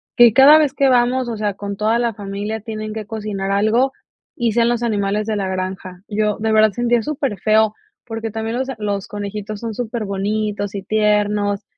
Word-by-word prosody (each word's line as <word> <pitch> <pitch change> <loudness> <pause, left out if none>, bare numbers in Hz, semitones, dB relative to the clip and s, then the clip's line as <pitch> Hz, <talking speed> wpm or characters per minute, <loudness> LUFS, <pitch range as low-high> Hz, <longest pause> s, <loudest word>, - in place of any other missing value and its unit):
que 240 -2 +7
cada 275 +4 +8
vez 300 -4 +2
que 275 -2 +3
vamos, 250 0 +2
o 230 - -4
sea, 210 -1 -1
con 200 0 -6
toda 220 +3 +1
la 235 -3 -1
familia 205 +2 -5
tienen 215 -1 -5
que 215 -1 -5
cocinar 205 -2 -4
algo 220 +6 +2 0.4
y 235 -2 0
sean 235 +1 +3
los 240 -1 0
animales 210 -2 -1
de 220 - 0
la 200 -2 -2
granja", 185 -1 -5
yo 210 0 0
de 220 +1 0
verdad 215 0 +5
sentía 240 +1 +1
súper 275 -7 -2
feo 215 +1 +3 0.3
porque 225 -1 -5
también 225 +2 -3
los 260 +1 -2
a 265 - -4
los 200 -2 -2
conejitos 205 0 -5
son 225 -1 -5
súper 230 -1 -3
bonitos 205 +1 -2
y 200 - -4
tiernos 210 0 +1
215 Hz, 200 wpm, -19 LUFS, 205-235 Hz, 0.4 s, cada